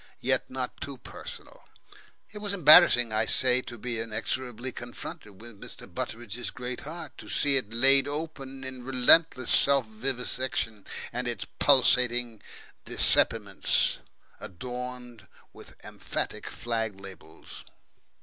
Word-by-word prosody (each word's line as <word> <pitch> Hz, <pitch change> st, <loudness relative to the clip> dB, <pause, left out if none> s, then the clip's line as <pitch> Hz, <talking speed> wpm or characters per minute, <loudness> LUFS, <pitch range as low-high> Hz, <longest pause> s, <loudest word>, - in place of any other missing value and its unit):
Yet -, -, -1 dB
not -, -, -5 dB
too -, -, -6 dB
personal. -, -, -11 dB, 0.7 s
It 210 Hz, -, -9 dB
was 205 Hz, -1 st, -3 dB
embarrassing, 150 Hz, -, +7 dB
I 110 Hz, +1 st, +1 dB
say, 125 Hz, -1 st, +4 dB
to 120 Hz, -, -9 dB
be 120 Hz, 0 st, -5 dB
inexorably 115 Hz, +2 st, -4 dB
confronted 110 Hz, -4 st, -9 dB
with 115 Hz, -2 st, -14 dB
Mr. -, -, -8 dB
Butteridge's 120 Hz, +1 st, -5 dB
great 125 Hz, -1 st, -6 dB
heart, 165 Hz, +4 st, -8 dB
to -, -, -11 dB
see 140 Hz, -1 st, +3 dB
it 125 Hz, -5 st, +1 dB
laid 135 Hz, +4 st, +4 dB
open 145 Hz, -3 st, -6 dB
in 130 Hz, -1 st, -8 dB
relentlesss 130 Hz, +2 st, +4 dB
self 140 Hz, -3 st, +5 dB
vivisection, 120 Hz, -2 st, -2 dB, 0.3 s
and 125 Hz, +1 st, -3 dB
its 120 Hz, -, -4 dB
pulsating 125 Hz, -4 st, +3 dB, 0.4 s
dissepiments -, -, +2 dB, 0.4 s
adorned 125 Hz, +3 st, -8 dB, 0.3 s
with -, -, -14 dB
emphatic -, -, -5 dB
flag 115 Hz, -4 st, -4 dB
labels. 95 Hz, -5 st, -12 dB
125 Hz, 120 wpm, -27 LUFS, 115-135 Hz, 0.7 s, embarrassing